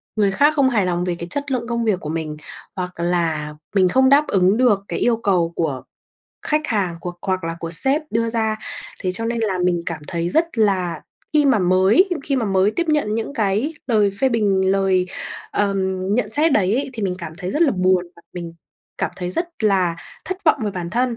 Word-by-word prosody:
người 205 -3 +2
khác 290 +8 +3
không 275 -3 +4
hài 215 -7 +1
lòng 175 -1 0
về 180 -1 -1
cái 170 - -5
chất 285 +4 -4
lượng 240 -3 -1
công 235 -1 -1
việc 205 -5 +1
của 150 - -6
mình, 155 -1 -3 0.4
hoặc 180 -2 -5
là 165 -3 -1 0.2
mình 185 -2 +4
không 260 +7 +4
đáp 285 +2 +5
ứng 190 +2 +3
được 240 -5 +4
cái - - -3
yêu 235 -2 +2
cầu 185 -6 +1
của 145 -6 -2 0.6
khách 305 0 +1
hàng, 195 - -1
của 175 +1 -5
hoặc 185 -2 -1
là 165 0 -3
của 165 - -4
sếp 270 - +2
đưa 230 +1 0
ra. 220 -1 0 0.4
Thế 185 - -1
cho 225 +5 -2
nên 235 +1 -1
là 200 -4 0
mình 175 -1 +2
cảm 160 -3 -4
thấy 170 0 -2
rất 320 - 0
là 185 -6 +1 0.3
khi 300 -1 +4
mà 265 -5 +4
mới 190 - +4 0.2
khi 275 - 0
mà 245 - 0
mới 195 0 +3
tiếp 340 +8 -2
nhận 295 -9 +1
những 225 +5 -3
cái 215 +8 0
lời 215 -5 +3
phê 265 - +4
bình, 200 -5 +2
lời, 190 -2 +2 0.4
ờm, 200 -1 0 0.4
nhận 220 -2 -1
xét 305 +5 +3
đấy 200 -4 +3
ấy, 270 +2 -1
thì 225 -4 -6
mình 190 -2 0
cảm 160 - -6
thấy 180 -1 -4
rất 300 - +1
là 310 - +4
buồn 185 -2 +2
và 170 - -17
mình 170 -2 -7 0.4
cảm - - -1
thấy 180 -1 -4
rất 340 - -2
là 185 -5 +2 0.3
thất 375 +1 -5
vọng 310 - +5
về 210 - -1
bản 175 -3 -5
thân. 240 +2 0
200 Hz, 225 wpm, -21 LUFS, 180-245 Hz, 0.6 s, đáp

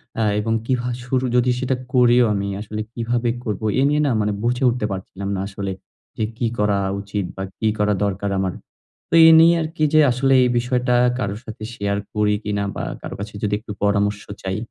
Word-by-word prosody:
অ্যা 110 - 0
এবং 110 +1 -1
কি 130 - +1
ভা 125 - -3 0.2
শুরু 130 +1 0
যদি 125 0 +3
সেটা 130 0 0 0.2
করিও 125 -1 +5
আমি, 100 0 -2
আসলে 105 0 -5
কিভাবে 120 0 -1
করব? 105 -2 -3 0.2
এ - - +3
নিয়ে 150 +1 +2
না, - - +2
মানে 105 - 0
বুঝে 125 +2 0
উঠতে 120 -2 -1
পারছিলাম 95 +1 -5
না 95 - -3
আসলে 100 -1 -5 0.5
যে, 110 - -1
কি 120 - 0
করা 105 -1 +2 0.2
উচিত? 100 -1 -3
বা 95 - -4 0.2
কি 110 - +1
করা 105 0 +2
দরকার 100 0 -1
আমার? 95 -2 -1 0.6
তো - - -7
এ - - +9
নিয়ে 170 +1 +6
আরকি 155 0 -3
যে, 155 - +6
আসলে 135 +2 +2
এই 125 - +2
বিষয়টা 125 0 +1 0.2
কারো 100 -5 -2
সাথে 110 -1 -9
শেয়ার 100 -1 -1 0.2
করি 105 -1 +2
কিনা, 100 -1 -1
বা - - -4 0.2
কারো - - -6
কাছে 105 +1 -6
যদি 105 0 0
একটু 110 -1 -9
পরামর্শ 100 0 +1 0.2
চাই। 95 +1 -2
110 Hz, 205 wpm, -21 LUFS, 100-125 Hz, 0.6 s, এ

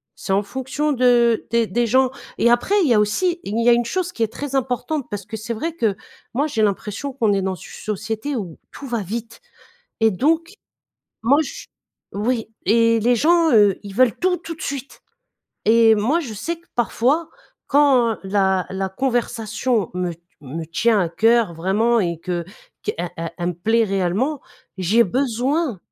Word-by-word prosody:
c'est 195 - -3
en 200 +2 +2
fonction 265 +7 -2
de 240 -3 +3
des 235 0 +2
des 240 +1 0
gens. 260 +2 +3 0.3
Et 235 - +3
après, 240 +12 +2
il 305 - +2
y - - +5
a 210 - +4
aussi 340 - +1
il 220 +3 -1
y 240 - +5
a - - +7
une 240 0 +1
chose 360 +8 -2
qui 240 - -8
est 225 -1 +1
très 280 +1 -5
importante, 265 +3 -1
parce 205 -2 -5
que 220 - -6
c'est 225 +2 -4
vrai 320 +9 -3
que 225 - 0 0.4
moi, 275 +5 +1
j'ai 230 -7 -1
l'impression 210 +6 -1
qu'on 230 -5 +1
est 200 -1 +1
dans 190 0 -2
ch 180 - -12
une 215 - 0
société 220 +7 -4
où 185 -9 -5
tout 280 - -9
va 235 -3 -2
vite, 225 +4 -6 0.6
et 225 0 +5
donc, 325 - 0 0.7
moi 270 +6 +4
je - - -8 0.5
oui, 225 +2 -1 0.2
et 230 +2 +4
les 245 +3 +3
gens, 335 +3 +4
heu, 205 -5 +5
ils 200 -1 -8
veulent 245 +1 +3
tout, 360 0 +1
tout 330 0 -7
de - - -13
suite! 275 -1 -5 0.7
Et 225 0 +6
moi, 225 +10 +1
je 260 -9 -6
sais 275 +12 -4
que 340 - -27
parfois, 255 +7 +1 0.4
quand 265 -6 +4
la 190 -1 +1
la 190 0 -2
conversation 230 -1 -1
me 180 -1 -2
t 170 - -29 0.2
me 150 +4 -6
tient 215 +7 +2
à 175 - 0
cœur, 225 +2 +3
vraiment, 210 +8 +2
et 170 -4 -1
que 175 0 -3 0.4
qu'elle 175 0 -3
elle 165 0 -4
elle 175 - -2
me - - -1
plaît 225 +7 +2
réellement, 200 - -1 0.4
j'ai 205 +6 +3
besoin 255 - 0
230 Hz, 190 wpm, -21 LUFS, 200-265 Hz, 0.7 s, a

